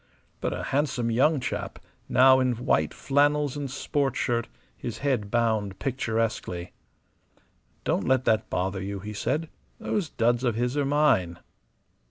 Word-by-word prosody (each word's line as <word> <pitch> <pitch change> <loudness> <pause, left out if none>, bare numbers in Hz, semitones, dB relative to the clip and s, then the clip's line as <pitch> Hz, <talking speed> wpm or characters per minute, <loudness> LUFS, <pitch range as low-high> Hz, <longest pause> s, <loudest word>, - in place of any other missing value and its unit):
But - - -1
a - - -4
handsome 130 -5 0
young 140 +6 +3
chap, 105 -6 -4 0.3
now, 130 +1 +6
in 130 -1 +2
white 120 +3 +1
flannels 145 0 +1
and 145 -2 -4
sport 135 0 -1
shirt, 120 -1 0 0.3
his 115 -2 -6
head 120 -8 0
bound 110 -4 0
picturesquely 115 -8 -2 1.1
"Don't - - 0
let 130 0 +2
that 110 -1 +2
bother 95 +1 -1
you," 100 0 -4
he 105 +2 -6
said. 155 +9 -1 0.3
"Those 195 -7 -2
duds 120 +1 +1
of 120 -4 +1
his 120 +3 -1
are 145 -1 +1
mine." 135 - +2
120 Hz, 145 wpm, -26 LUFS, 110-140 Hz, 1.1 s, now